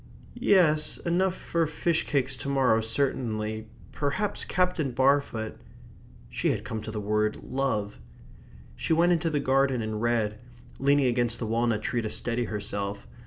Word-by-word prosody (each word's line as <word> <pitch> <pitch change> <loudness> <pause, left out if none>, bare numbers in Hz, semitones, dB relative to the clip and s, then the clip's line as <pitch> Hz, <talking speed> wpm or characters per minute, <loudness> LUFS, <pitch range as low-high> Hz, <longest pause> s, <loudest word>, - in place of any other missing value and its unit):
"Yes, 155 -6 +3
enough 180 +2 +1
for 165 -1 -1
fish 160 +2 0
cakes 135 -2 0
to 140 +1 -5
morrow 130 -5 +3
certainly 110 -3 -1 0.2
Perhaps 170 +9 -2
Captain 180 -5 0
Barfoot 130 -4 +1 0.3
" - - -23 0.3
she - - -1
had - - -1
come 115 -3 -4
to 105 - -7
the 110 -1 -4
word 105 +1 0
"love." 115 -6 -2 0.8
She - - 0
went 170 +2 +4
into 165 -1 +1
the 150 -2 0
garden 135 -1 +2
and 110 0 -3
read, 110 -3 0 0.4
leaning 140 0 +3
against 120 -1 +1
the 115 - -4
walnut 115 -1 0
tree 120 - 0
to 110 - -3
steady 120 +2 -1
herself. 100 -1 -4
125 Hz, 155 wpm, -27 LUFS, 110-145 Hz, 0.8 s, went